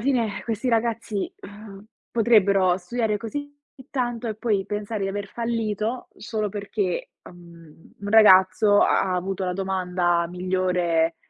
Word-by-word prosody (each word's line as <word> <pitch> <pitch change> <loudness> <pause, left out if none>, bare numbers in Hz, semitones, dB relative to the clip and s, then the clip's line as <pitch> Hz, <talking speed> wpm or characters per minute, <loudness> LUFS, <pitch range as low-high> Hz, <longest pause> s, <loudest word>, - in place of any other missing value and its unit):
fine 230 -6 0
questi 230 +2 -2
ragazzi, 230 -3 -1
uhm, 205 0 -12 0.3
potrebbero 200 -5 +3
studiare 215 +3 -1
così 285 +7 -6 0.4
tanto 240 -3 -2
e 215 - -3
poi 210 -3 -1
pensare 210 0 -4
di 195 - -1
aver 200 +1 -4
fallito 230 +1 -3
solo 215 -2 -3
perché, 200 -2 -3
uhm, 170 -2 -16
un 205 0 -5
ragazzo 205 0 +6
ha - - +3
ha - - 0
avuto 190 +1 -2
la 180 - -1
domanda 180 -2 0
migliore, 180 -2 0
205 Hz, 135 wpm, -24 LUFS, 185-225 Hz, 0.4 s, ragazzo